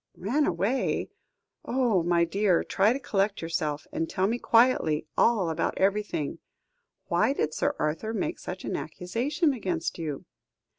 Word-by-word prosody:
"Ran 255 Hz, +11 st, +1 dB
away? 200 Hz, +10 st, 0 dB, 0.5 s
Oh! 240 Hz, -7 st, +2 dB
my 170 Hz, 0 st, +2 dB
dear; 195 Hz, 0 st, +2 dB
try 200 Hz, +3 st, +2 dB
to 255 Hz, -, 0 dB
collect 200 Hz, -5 st, 0 dB
yourself, 155 Hz, -2 st, -2 dB
and 165 Hz, -, -2 dB
tell 185 Hz, -, 0 dB
me 230 Hz, +4 st, 0 dB
quietly 230 Hz, -12 st, +3 dB
all 205 Hz, -8 st, +3 dB
about 160 Hz, -, -1 dB
everything. 195 Hz, -6 st, 0 dB, 0.7 s
Why 275 Hz, -, +2 dB
did 155 Hz, -, -1 dB
Sir -, -, 0 dB
Arthur 155 Hz, +9 st, -1 dB
make 315 Hz, +9 st, -2 dB
such -, -, -7 dB
an -, -, -2 dB
accusation 275 Hz, -, -1 dB
against 180 Hz, -9 st, -3 dB
you?" 150 Hz, -4 st, -4 dB
195 Hz, 145 wpm, -27 LUFS, 165-235 Hz, 0.7 s, quietly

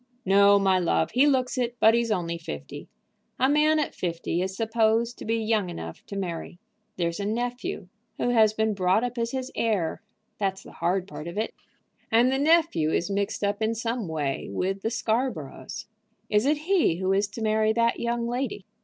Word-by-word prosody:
"No, 200 Hz, +1 st, +6 dB
my 190 Hz, -2 st, +3 dB
love. 175 Hz, -, +1 dB
He 265 Hz, +4 st, +4 dB
looks 260 Hz, -2 st, +1 dB
it, 240 Hz, -1 st, -1 dB
but 220 Hz, -, +6 dB
he's 235 Hz, 0 st, +1 dB
only 170 Hz, -5 st, -1 dB
fifty. 75 Hz, -, -7 dB, 0.5 s
A 260 Hz, -, +4 dB
man 300 Hz, +2 st, +4 dB
at 305 Hz, -, -1 dB
fifty 170 Hz, 0 st, -2 dB
is 190 Hz, +1 st, -3 dB
supposed 225 Hz, +1 st, +1 dB
to -, -, -7 dB
be 225 Hz, -, +1 dB
young 215 Hz, -4 st, 0 dB
enough 80 Hz, -, -7 dB
to 200 Hz, -, -7 dB
marry. 175 Hz, -2 st, -4 dB, 0.4 s
There's 170 Hz, 0 st, -1 dB
a 200 Hz, -, -2 dB
nephew 245 Hz, -, -3 dB, 0.3 s
who -, -, 0 dB
has 220 Hz, -3 st, +5 dB
been 220 Hz, 0 st, 0 dB
brought 190 Hz, +3 st, +2 dB
up 245 Hz, 0 st, -3 dB
as 230 Hz, 0 st, 0 dB
his 260 Hz, +1 st, -4 dB
heir; 205 Hz, -8 st, 0 dB, 0.4 s
that's 195 Hz, -2 st, -1 dB
the -, -, -12 dB
hard 185 Hz, +1 st, -1 dB
part 170 Hz, -4 st, -8 dB
of 170 Hz, -, -7 dB
it. 220 Hz, -, -1 dB, 0.6 s
And 235 Hz, +3 st, +5 dB
the 265 Hz, -, +1 dB
nephew 310 Hz, -, +3 dB
is 175 Hz, +4 st, 0 dB
mixed 200 Hz, +1 st, -1 dB
up 205 Hz, +1 st, 0 dB
in 220 Hz, +1 st, +1 dB
some 230 Hz, -2 st, -2 dB
way 150 Hz, -4 st, -2 dB
with 190 Hz, -, -2 dB
the 220 Hz, -, -1 dB
Scarboroughs." 220 Hz, -, -3 dB, 0.5 s
"Is 210 Hz, +4 st, +3 dB
it 300 Hz, +1 st, +3 dB
he 365 Hz, -, +3 dB
who 190 Hz, +2 st, 0 dB
is 200 Hz, +1 st, +2 dB
to 215 Hz, +3 st, -7 dB
marry 215 Hz, 0 st, +2 dB
that 235 Hz, +1 st, +1 dB
young 235 Hz, 0 st, -1 dB
lady?" 240 Hz, -5 st, -3 dB
220 Hz, 195 wpm, -26 LUFS, 185-240 Hz, 0.6 s, No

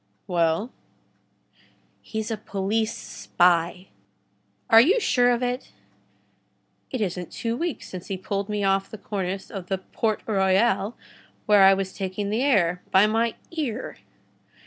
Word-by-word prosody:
"Well?" 170 Hz, +6 st, 0 dB, 1.3 s
"He's 220 Hz, 0 st, -4 dB
a -, -, 0 dB
police 215 Hz, +2 st, -1 dB
spy." 175 Hz, +1 st, +1 dB, 0.8 s
"Are 225 Hz, -, +8 dB
you 380 Hz, -, +4 dB
sure 245 Hz, -, +3 dB
of 245 Hz, 0 st, +1 dB
it?" 250 Hz, +1 st, -3 dB, 1.2 s
"It 255 Hz, -, -3 dB
isn't 180 Hz, -3 st, -3 dB
two 230 Hz, -1 st, -3 dB
weeks 335 Hz, +4 st, -4 dB
since 185 Hz, -1 st, -8 dB
he 195 Hz, -, -3 dB
pulled 200 Hz, +2 st, -3 dB
me 210 Hz, -1 st, -1 dB
off 195 Hz, 0 st, +1 dB
the 220 Hz, -, -8 dB
cornice 195 Hz, -2 st, -4 dB
of 190 Hz, -3 st, -7 dB
the 190 Hz, -, -1 dB
Port 215 Hz, +3 st, -2 dB
Royal, 195 Hz, +1 st, +2 dB, 0.5 s
where 210 Hz, -1 st, +5 dB
I 195 Hz, 0 st, +7 dB
was 190 Hz, -1 st, -3 dB
taking 195 Hz, +1 st, -3 dB
the 220 Hz, +3 st, 0 dB
air, 180 Hz, -10 st, +2 dB
by 190 Hz, +2 st, +5 dB
my 225 Hz, +1 st, +1 dB, 0.2 s
ear." 270 Hz, -8 st, -4 dB
205 Hz, 140 wpm, -25 LUFS, 190-230 Hz, 1.3 s, Are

